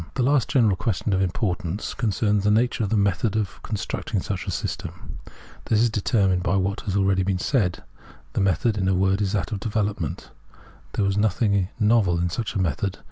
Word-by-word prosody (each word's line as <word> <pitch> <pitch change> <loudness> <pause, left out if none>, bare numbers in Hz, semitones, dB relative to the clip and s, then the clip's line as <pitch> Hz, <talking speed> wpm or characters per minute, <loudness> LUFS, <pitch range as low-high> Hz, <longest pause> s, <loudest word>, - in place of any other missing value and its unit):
The 130 - +1
last 135 -2 +3
general 115 -7 +3
question 105 -1 -1
of 95 - +2
importance 95 -1 -2
concerns 105 -3 0
the 105 - +3
nature 115 +2 +2
of 100 - -1
the 110 - +1
method 100 +1 +1
of 105 -3 -2
constructing 105 - -3
such - - -4
a - - -2
system. - - -5 0.5
This 110 - +2
is 115 0 +3
determined 95 -3 +1
by 95 - +1
what 100 +2 0
has 100 -3 -3
been 100 - +3
already 95 0 +1
said. 90 -2 0 0.5
The - - 0
method, 95 +4 +1
in 95 - 0
a 95 - +3
word, 95 +2 +2
is 100 -2 0
that 100 - -1
of 105 - -2
development. 105 -7 -2 0.6
There 105 - +1
was 100 0 0
nothing 100 -2 +1
novel 105 -5 +3
in 85 0 0
such 115 +5 -3
a - - 0
method. 90 +2 -1
100 Hz, 195 wpm, -24 LUFS, 95-110 Hz, 0.6 s, last